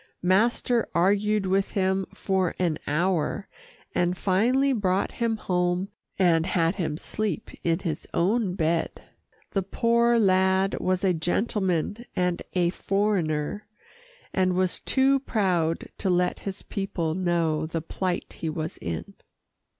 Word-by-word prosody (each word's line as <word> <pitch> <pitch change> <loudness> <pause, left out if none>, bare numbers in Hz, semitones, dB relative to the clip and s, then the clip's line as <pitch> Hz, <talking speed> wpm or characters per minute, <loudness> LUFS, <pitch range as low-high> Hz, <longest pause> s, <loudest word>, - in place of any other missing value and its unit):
Master 230 +5 +2
argued 205 +3 +2
with 195 +1 +1
him 190 -1 +1
for 190 -3 -1
an 170 -4 0
hour, 175 +4 0 0.5
and 180 +1 +1
finally 245 +10 +2
brought 195 -4 0
him 230 -2 -1
home 180 -1 0 0.3
and 170 -3 +3
had 170 0 +1
him 160 -5 -2
sleep 215 +5 -3
in 165 -1 +2
his 165 -4 -4
own 195 +1 +1
bed. 165 -1 -1 0.5
The 195 - +1
poor 235 +4 +2
lad 190 -2 +3
was 185 0 0
a 190 -2 +3
gentleman 185 +3 -1
and 180 -1 0
a 175 -2 +2
foreigner, 195 -2 -1 0.7
and 185 -1 +2
was 185 -1 +1
too 270 +1 +3
proud 180 -10 0
to 195 - 0
let 180 0 +1
his 195 - -8
people 175 -5 -2
know 165 -3 0
the 165 +1 -2
plight 180 +2 -3
he 165 - -2
was 155 0 -4
in. 80 -1 -5
185 Hz, 130 wpm, -26 LUFS, 170-205 Hz, 0.7 s, and